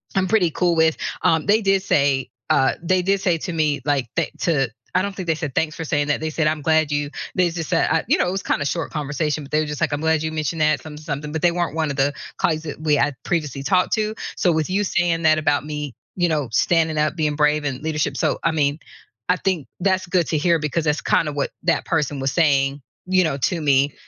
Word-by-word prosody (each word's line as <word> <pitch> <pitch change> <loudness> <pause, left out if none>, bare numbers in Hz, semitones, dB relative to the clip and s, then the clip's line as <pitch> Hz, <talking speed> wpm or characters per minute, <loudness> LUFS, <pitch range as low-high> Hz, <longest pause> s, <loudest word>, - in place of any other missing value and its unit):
I'm 190 -1 +2
pretty 185 -6 +2
cool 175 0 +1
with, 160 -1 +3 0.3
um, 160 -1 +2
they 210 +2 +3
did 195 -2 +2
say 140 -5 +1 0.2
uh, 135 0 +3
they 180 +2 +2
did 195 +1 +1
say 175 -4 +2
to 175 - -4
me, 150 -3 0
like, 140 -4 +1
they - - 0
to 135 -7 +1 0.3
I 185 - +4
don't 200 -1 -4
think 185 -3 -6
they 160 - +2
said, 155 -5 -5
"Thanks 155 -1 0
for 165 - -5
saying 145 0 0
that," 145 - +1
they 155 0 -3
said, 155 0 +1
"I'm 155 0 0
glad 160 -1 +2
you" 145 0 -1 0.2
they 185 -1 +3
just 165 -2 -5
said, 165 - +2
uh, - - +3
you - - +3
know, - - +1
it - - 0
was 190 +1 -2
kinda 145 - -1
short 165 +1 -2
conversation, 150 +1 -2
but 140 - -13
they 155 - +2
were 155 - -1
just 150 -1 -5
like, - - +1
"I'm 145 - -2
glad 160 -1 +1
you 160 - -2
mentioned 155 +1 -2
that 155 0 +2
something-something," 150 -1 -6
but 160 +1 -4
they 175 - +5
weren't 175 -3 -2
one 160 -2 0
of - - -4
the 140 +1 +2 0.3
colleagues 160 -1 0
that 150 -1 -7
we 155 -2 +2
had 145 -1 +1
previously 150 -6 -2
talked 180 +6 +1
to. 215 0 0 0.2
So, 175 - +2
with 160 -1 0
you 205 +2 +1
saying 175 -3 +1
that 155 0 +5
about 145 -2 +1
me, 150 -3 -5 0.2
you 175 -1 +2
know, 150 -6 -1
standing 160 +5 +2
up, 150 +2 +1
being 155 -3 0
brave 150 0 +2
in 135 0 -3
leadership 150 -3 -1
so, - - 0
I - - +3
mean, 150 -1 0 0.5
I 180 - +5
think 180 -8 -1
that's 185 0 +1
good 175 -2 +1
to 160 - +1
hear 170 +2 +3
because 150 +2 -1
that's 150 0 +1
kinda 150 - +1
what 145 -1 -2
that - - +1
person 150 -3 -1
was 135 0 0
saying, 140 -3 +2 0.2
you 185 0 +3
know, 155 -5 -1
to 165 +4 -1
me, 140 -1 +3
155 Hz, 255 wpm, -21 LUFS, 145-170 Hz, 0.5 s, they